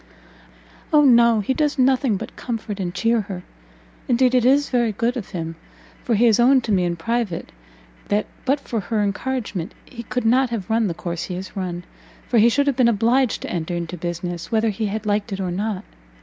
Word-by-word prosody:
"O 300 Hz, -1 st, +6 dB
no! 235 Hz, -3 st, +5 dB
he 235 Hz, +6 st, 0 dB
does 295 Hz, +1 st, 0 dB
nothing 255 Hz, -4 st, +3 dB
but -, -, -8 dB
comfort 225 Hz, -4 st, -5 dB
and 180 Hz, -2 st, -2 dB
cheer 230 Hz, +4 st, +1 dB
her! 190 Hz, -3 st, -7 dB, 0.7 s
and 240 Hz, -1 st, +2 dB
indeed 255 Hz, -1 st, +4 dB
it 250 Hz, -2 st, +4 dB
is 280 Hz, +3 st, +3 dB
very 240 Hz, -3 st, +2 dB
good 230 Hz, +4 st, -1 dB
of 230 Hz, -7 st, -5 dB
him, 165 Hz, -2 st, -5 dB, 0.5 s
for 235 Hz, -, +1 dB
he 230 Hz, +4 st, +4 dB
has 225 Hz, -1 st, +4 dB
owned 255 Hz, +1 st, +5 dB
to 225 Hz, -, -2 dB
me 185 Hz, -3 st, +2 dB
in 175 Hz, 0 st, -1 dB
private, 225 Hz, -1 st, -2 dB, 0.6 s
that 205 Hz, +1 st, +1 dB, 0.2 s
but 275 Hz, +2 st, +1 dB
for 235 Hz, -5 st, -3 dB
her 210 Hz, +2 st, -1 dB
encouragement, 205 Hz, -2 st, -3 dB
he 240 Hz, -3 st, -9 dB
could 245 Hz, +1 st, -3 dB
not 255 Hz, +3 st, +3 dB
have 225 Hz, -3 st, -4 dB
run 225 Hz, -1 st, +2 dB
the 170 Hz, -, -3 dB
course 170 Hz, 0 st, -4 dB
he 180 Hz, -, -5 dB
has 185 Hz, +1 st, -7 dB
run, 180 Hz, -2 st, -4 dB, 0.4 s
for 235 Hz, -, +3 dB
he 230 Hz, +2 st, +6 dB
should 285 Hz, +4 st, +2 dB
have 280 Hz, -2 st, +1 dB
been 250 Hz, -2 st, +4 dB
obliged 235 Hz, +3 st, +2 dB
to -, -, -5 dB
enter 175 Hz, 0 st, -3 dB
into 170 Hz, +1 st, -4 dB
business, 175 Hz, +1 st, -5 dB
whether 225 Hz, 0 st, +2 dB
he 210 Hz, +2 st, -2 dB
had 215 Hz, +2 st, -4 dB
liked 210 Hz, +1 st, 0 dB
it 195 Hz, -, -3 dB
or 185 Hz, -2 st, -2 dB
not. 200 Hz, +1 st, -2 dB
220 Hz, 215 wpm, -22 LUFS, 185-245 Hz, 0.7 s, O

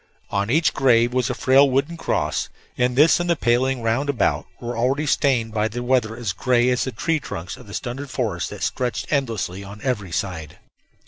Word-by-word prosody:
On 100 Hz, +1 st, 0 dB
each 160 Hz, +6 st, +3 dB
grave 120 Hz, -2 st, +3 dB
was 130 Hz, +1 st, +1 dB
a 125 Hz, -, -2 dB
frail 135 Hz, +2 st, +5 dB
wooden 140 Hz, +6 st, 0 dB
cross, 165 Hz, -, -1 dB, 0.3 s
and 125 Hz, 0 st, +1 dB
this 150 Hz, +6 st, +5 dB
and 175 Hz, 0 st, -2 dB
the 170 Hz, -, +4 dB
paling 125 Hz, -1 st, +1 dB
round 115 Hz, +6 st, 0 dB
about 130 Hz, -7 st, 0 dB
were 120 Hz, 0 st, -5 dB
already 130 Hz, +6 st, 0 dB
stained 125 Hz, -6 st, +1 dB
by 110 Hz, 0 st, +1 dB
the 120 Hz, +3 st, -5 dB
weather 120 Hz, -3 st, +1 dB
as 115 Hz, -7 st, -2 dB
gray 125 Hz, +4 st, +2 dB
as 125 Hz, -, +1 dB
the 130 Hz, -, -3 dB
tree 160 Hz, +4 st, -1 dB
trunks 90 Hz, -, -6 dB
of -, -, -14 dB
the 100 Hz, -, -10 dB
stunted 135 Hz, +2 st, -5 dB
forest 110 Hz, -, -2 dB
that -, -, -7 dB
stretched 115 Hz, -2 st, -2 dB
endlessly 110 Hz, -9 st, -1 dB
on 100 Hz, +1 st, -10 dB
every 105 Hz, -9 st, -2 dB
side. 90 Hz, -5 st, -4 dB
125 Hz, 200 wpm, -22 LUFS, 110-135 Hz, 0.3 s, frail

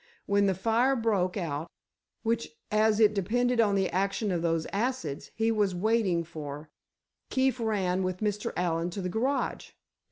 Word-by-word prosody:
When 200 Hz, 0 st, +3 dB
the 190 Hz, -, +2 dB
fire 230 Hz, +7 st, +2 dB
broke 210 Hz, -6 st, +1 dB
out—which 170 Hz, +5 st, -5 dB, 0.2 s
as 215 Hz, 0 st, +3 dB
it 215 Hz, -1 st, +5 dB
depended 235 Hz, +5 st, +1 dB
on 205 Hz, -3 st, +2 dB
the 190 Hz, -1 st, +2 dB
action 195 Hz, +2 st, 0 dB
of 175 Hz, -2 st, 0 dB
those 165 Hz, -1 st, 0 dB
acids, 205 Hz, -, -2 dB
he 225 Hz, +1 st, +2 dB
was 205 Hz, -4 st, +1 dB
waiting 195 Hz, -3 st, +1 dB
for, 150 Hz, -2 st, -8 dB, 0.6 s
Keefe 260 Hz, -1 st, +1 dB
ran 195 Hz, -5 st, 0 dB
with 185 Hz, -1 st, -1 dB
Mr. 210 Hz, 0 st, -1 dB
Allen 170 Hz, -1 st, 0 dB
to 195 Hz, +3 st, -5 dB
the 180 Hz, -, -1 dB
garage. 255 Hz, +8 st, -1 dB
200 Hz, 155 wpm, -29 LUFS, 175-225 Hz, 0.6 s, it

